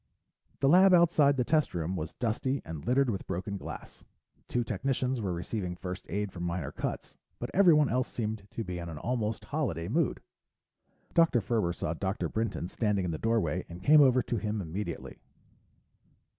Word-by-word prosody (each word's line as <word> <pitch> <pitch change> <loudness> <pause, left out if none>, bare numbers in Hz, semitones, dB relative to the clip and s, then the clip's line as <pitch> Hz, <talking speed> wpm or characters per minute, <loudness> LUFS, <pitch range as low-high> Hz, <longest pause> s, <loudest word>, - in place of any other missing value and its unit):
The 135 - +4
lab 185 +4 +7
outside 155 -5 +4
the 125 - +2
test 155 - +1
room 85 +2 -2
was 80 -2 -4
dusty 130 +4 -1
and 80 -3 -6
littered 130 0 +3
with 100 - -5
broken 100 +3 -3
glass. 100 - -8 0.4
Two 120 - 0
technicians 125 +3 -1
were 95 -3 -1
receiving 90 +1 -3
first 90 +1 -7
aid 105 0 -2
for 90 - -9
minor 85 -3 -3
cuts, - - -5 0.2
but - - -5
everyone 165 -7 +6
else 125 +1 0
seemed 110 -3 -4
to 115 - -4
be 90 -3 -5
in 85 0 -6
an 80 - -7
almost 115 +1 -2
holiday 120 - -2
mood. 150 - 0 0.9
Dr. 165 -7 +4
Ferber 110 -4 0
saw 80 -1 -3
Dr. 95 +4 -2
Brinton 110 -6 -2
standing 100 -1 0
in 85 - -1
the 80 - -4
doorway 100 -7 0
and 85 +2 -9
came 150 +7 +7
over 130 -2 +5
to 120 - -2
him 105 +1 -2
immediately. 95 +3 -5
110 Hz, 175 wpm, -30 LUFS, 90-130 Hz, 0.9 s, lab